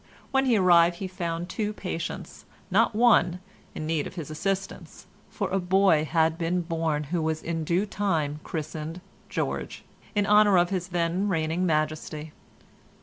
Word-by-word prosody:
When 270 -1 +2
he 235 -3 +4
arrived 175 -2 +5
he 190 +2 -5
found 175 -2 -4
two 210 +1 -2
patients, 180 -5 -6 0.3
not 220 - +3
one, 195 -7 +4 0.4
in 155 - -4
need 155 -2 -1
of - - -11
his 155 -4 -6
assistance, 195 +4 -4 0.2
for - - -3
a 195 - +1
boy 185 -4 +3
had 160 +1 +1
been 175 +2 0
born 165 -3 -1
who 170 - +1
was 160 0 -2
in 165 -1 -2
due 175 +6 +1
time 160 -8 -1
christened 155 +1 -5 0.3
George, - - -3 0.3
in 205 -1 +2
honour 210 -1 +5
of 175 +1 +3
his 180 -2 -2
then 175 +2 0
reigning 165 +1 0
majesty. 155 -1 -2
170 Hz, 155 wpm, -26 LUFS, 160-190 Hz, 0.4 s, arrived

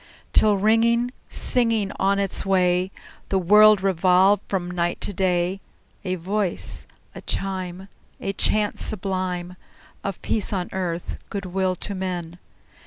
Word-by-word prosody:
Till, 210 -2 +5
ringing, 230 +4 +3 0.2
singing 230 -5 +2
on 195 +1 +2
its 200 -1 0
way, 185 -1 +2 0.4
The 195 - +1
world 210 +2 +6
revolved 190 +2 +4
from 180 -3 -2
night 175 -1 -1
to 205 - -1
day, 180 0 0 0.4
A 185 -1 -1
voice, 190 +1 -3 0.3
a - - -9
chime, 190 -1 -4 0.3
A 195 - -3
chant 210 +1 0
sublime 185 -3 -3 0.5
Of 195 -2 -4
peace 215 - 0
on 180 -2 -2
earth, 175 -2 -3
good 200 -1 -4
will 185 0 -1
to 200 - -5
men! 180 -3 -4
190 Hz, 130 wpm, -23 LUFS, 180-200 Hz, 0.5 s, world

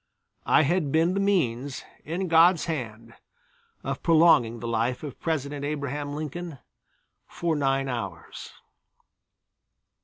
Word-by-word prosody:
I - - +5
had 155 -1 0
been 165 +4 +2
the 195 - -1
means, 145 -10 0 0.2
in 175 +5 -3
God's 165 +1 +5
hand, 115 -7 -5 0.7
of - - -4
prolonging 155 -9 +4
the 120 - -5
life 115 +3 -1
of 145 -4 -8
President 145 -3 -2
Abraham 145 0 -3
Lincoln 155 +1 -6 0.7
for 170 -2 -2
nine 135 -1 0
hours. 100 -10 -6
145 Hz, 115 wpm, -26 LUFS, 125-165 Hz, 0.7 s, I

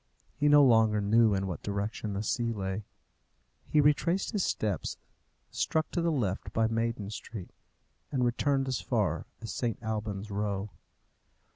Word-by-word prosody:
He 145 0 +2
no 145 0 +8
longer 110 -4 +5
knew 110 +1 +4
in 95 0 -1
what 90 -6 -4
direction 100 +1 -3
the 100 +2 -2
sea 115 +1 0
lay. 100 -1 -3 0.8
He 150 - +3
retraced 150 +6 +2
his 205 -5 0
steps, 105 -5 -1 0.5
struck 160 0 0
to 175 - 0
the 170 0 +2
left 110 -10 -1
by 115 - +3
Maiden 115 -2 -1
Street, 105 -3 -7 0.6
and 130 -3 +1
returned 135 +3 +1
as 130 -2 -1
far - - 0 0.2
as 110 - -4
St. 120 -3 -1
Alban's 105 -2 -3
Row. 100 0 -2
110 Hz, 150 wpm, -30 LUFS, 100-130 Hz, 0.8 s, no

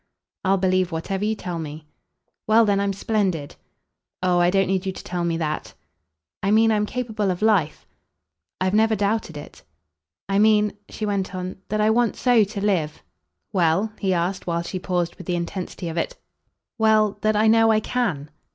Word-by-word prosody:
"I'll 195 0 +3
believe 185 -1 +1
whatever 190 +5 -3
you 215 +1 0
tell 180 -5 -5
me." 155 0 -7 0.6
"Well 225 +1 +5
then, 200 -1 +2
I'm 200 0 0
splendid." 195 -7 -1 0.7
"Oh 180 -1 +3
I 175 0 +4
don't 195 +1 +2
need 190 0 0
you 190 - -2
to - - -10
tell 175 -1 -3
me 170 -1 0
that." 155 -2 -3 0.7
"I 195 - 0
mean 225 +2 +4
I'm 210 -1 +1
capable 220 -5 -2
of 180 +2 -2
life." 195 -9 +2 0.7
"I've 185 +1 0
never 220 +1 +3
doubted 205 -5 -1
it." 145 - -11 0.7
"I 195 +1 +1
mean," 210 -1 +4 0.2
she 215 - -4
went 195 -2 -2
on, 185 0 -5
"that 215 0 0
I 215 +1 +4
want 235 0 +2
so 245 -3 +4
to 200 0 -4
live 160 -7 -1 0.2
!" - - -54
"Well?" 185 +4 +2
he 195 -2 0
asked 180 +2 -1
while 170 0 -1
she 185 +2 -5
paused 175 -2 -2
with 185 - -11
the 180 - 0
intensity 175 +1 -4
of 165 0 -5
it. 165 - -2 0.6
"Well, 215 -2 +3
that 215 0 +2
I 215 +1 +3
know 225 0 +5
I 215 - +4
CAN." 200 - -2
195 Hz, 190 wpm, -23 LUFS, 175-215 Hz, 0.7 s, Well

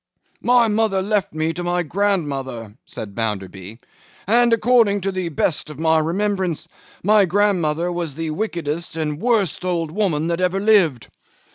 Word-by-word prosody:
'My 245 -1 +4
mother 210 -2 +1
left 200 +1 0
me 155 +1 -1
to 175 - -5
my 175 0 0
grandmother,' 140 - -2
said 100 -2 -6
Bounderby; 100 -2 -4 0.5
'and, 235 +3 +4
according 230 -3 +3
to 195 +1 -1
the 185 -2 -3
best 150 +1 0
of 150 - -9
my 160 0 +2
remembrance, 180 -1 -1 0.4
my 210 +1 +5
grandmother 175 -4 +1
was 170 -5 -4
the 165 0 -3
wickedest 170 -3 -3
and 155 -2 -1
the 150 +6 -8
worst 215 -9 +1
old 170 -3 -1
woman 170 -5 0
that 170 +1 -1
ever 185 +1 +1
lived. 190 - +3
175 Hz, 155 wpm, -20 LUFS, 155-205 Hz, 0.5 s, my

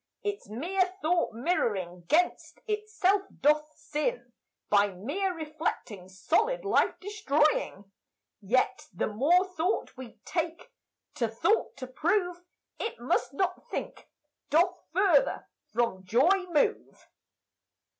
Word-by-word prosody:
Its 410 - -4
mere 365 - -1
thought 340 +2 +2
mirroring 205 - -1
gainst 350 +4 +1
itself 420 -2 +1 0.2
doth 300 +2 +3
sin, 310 +12 -3 0.3
By 205 0 +4
mere 290 - -2
reflecting 305 - -4
solid 410 - 0
life 405 - +2
destroying, 300 - 0 0.5
Yet 230 +6 +1
the 175 - -1
more 295 - +3
thought 365 +1 -2
we 255 -3 -9
take 335 +8 -3 0.4
to 235 - 0
thought 230 - 0
to 255 - -5
prove 350 +7 0 0.4
It 450 - -4
must 245 +2 0
not 365 +2 -2
think, - - -6 0.4
doth 345 +5 +4 0.2
further 355 -5 +3 0.2
from 215 -5 0
joy 335 - +3
move. 300 -4 0
315 Hz, 110 wpm, -29 LUFS, 240-375 Hz, 0.5 s, By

